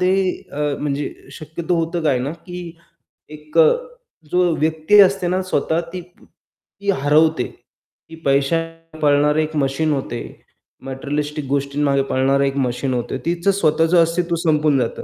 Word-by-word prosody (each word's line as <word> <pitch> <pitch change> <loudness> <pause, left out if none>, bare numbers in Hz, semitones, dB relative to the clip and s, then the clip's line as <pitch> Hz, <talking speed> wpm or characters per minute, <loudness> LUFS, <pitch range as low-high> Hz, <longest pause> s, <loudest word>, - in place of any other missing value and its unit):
ते 180 0 +3 0.4
अ, 145 - -5 0.2
म्हणजे 145 0 -2 0.2
शक्यतो 160 +3 -4
होतं 165 +1 -2
काय 145 -5 +2
ना, 135 +5 -3
की 175 -1 -9 0.5
एक 150 +1 -9
अ, 160 -1 +7 0.6
जो 180 0 +3
व्यक्ती 160 +6 +3
असते 195 -1 +3
ना 185 +2 0
स्वतः 165 -2 0
ती 185 - -4
ती 180 +3 -13
हरवते, 155 -1 +3 0.7
की 165 - -10
पैशा 140 +3 +2 0.4
पाळणारे 150 +1 +3
एक 155 0 -5
मशीन 140 +3 0
होते, 130 -4 -3 0.7
मटेरियलिस्टिक 145 +2 -3
गोष्टींमागे 140 0 +1
पळणारे 135 +1 +2
एक 135 - -2
मशीन 130 0 -1
होते, 120 +1 -2
तीचं 175 +3 +1
स्वतःचं 165 -2 +2
अस्तित्व 170 +1 0
संपून 155 -4 +2
जातं, 120 - -3
155 Hz, 140 wpm, -20 LUFS, 140-170 Hz, 0.7 s, अ